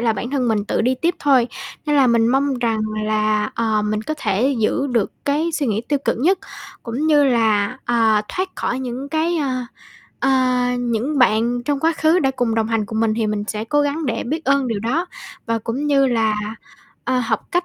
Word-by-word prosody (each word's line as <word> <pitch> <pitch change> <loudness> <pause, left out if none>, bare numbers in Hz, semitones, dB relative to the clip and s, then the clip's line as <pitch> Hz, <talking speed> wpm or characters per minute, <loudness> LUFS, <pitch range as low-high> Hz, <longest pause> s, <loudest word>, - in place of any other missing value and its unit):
là 230 -1 +2
bản 240 +3 -5
thân 265 -3 0
mình 210 -2 +1
tự - - -1
đi 250 +3 +2
tiếp 340 +1 +2
thôi. 265 -6 +3 0.4
Nên 295 -1 +2
là 270 -2 +5
mình 230 -1 +3
mong 275 +2 +2
rằng 230 -2 0 0.3
là, 215 0 +1
ờ, 220 -2 0
mình 210 0 -1
có 310 +7 -3
thể 230 +5 +1
giữ 225 +5 +1
được 235 -6 0
cái 305 +4 0
suy 300 -3 -1
nghĩ 215 -2 0
tiêu 290 - +1
cực - - 0
nhất, 350 +9 +2 0.4
cũng 255 +6 -3
như 295 -2 +5
là, 225 -2 +2
ờ, 225 -3 +3
thoát 370 +1 -2
khỏi 250 - -2
những 260 +2 -5
cái, 320 +3 0
ờ, 295 -4 0 0.7
ờ 255 -2 +2
những 245 +4 -1
bạn 240 0 +2
trong 285 +1 -1
quá 325 +2 +2
khứ 320 +3 +3
đã 270 -6 +2
cùng 245 -4 -1
đồng 225 -1 +1
hành 225 -2 0
cùng 220 +1 -3
mình 225 -1 +2
thì 225 -2 0
mình 210 -1 -2
sẽ 215 0 -3
cố 290 +6 +1
gắng 290 +1 -1
để 230 -2 -1
biết 315 +6 -3
ơn 275 -1 +2
điều 220 -3 -2
đó 290 - -1 0.4
và 230 -1 0
cũng 235 +6 -3
như 275 -2 +3
là, 225 -3 +1 0.7
ờ, 255 +1 +1
học 230 - -1
cách 355 0 +1
245 Hz, 220 wpm, -20 LUFS, 225-285 Hz, 0.7 s, là